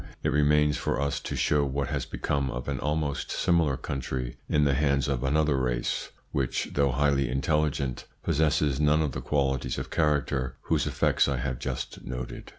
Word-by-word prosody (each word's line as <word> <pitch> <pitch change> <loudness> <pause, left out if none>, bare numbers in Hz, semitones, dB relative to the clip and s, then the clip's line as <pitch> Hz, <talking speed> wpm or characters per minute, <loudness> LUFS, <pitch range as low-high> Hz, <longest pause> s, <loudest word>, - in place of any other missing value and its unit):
It - - +2
remains 75 0 +3
for - - -1
us 70 0 0
to - - -5
show 75 -1 +2
what 70 0 -1
has 70 -4 -2
become 70 -1 -1
of 60 0 -5
an 70 -3 -2
almost 75 -1 -1
similar 80 -6 +2
country 65 -2 -4
in 75 - +3
the 70 -1 +3
hands 70 0 +2
of 65 -3 -1
another 75 +2 +2
race, 60 -2 -1 0.2
which, 65 -3 -1
though 70 -1 +3
highly 70 0 +2
intelligent, 70 -1 0 0.2
possesses 75 -2 +2
none 75 +1 +4
of 75 - -1
the - - -5
qualities 70 -3 0
of - - -5
character 70 -5 +1
whose - - 0
effects - - +2
I 70 -2 0
have 65 0 -3
just 65 -1 -4
noted. 65 -1 -6
70 Hz, 175 wpm, -27 LUFS, 65-75 Hz, 0.2 s, none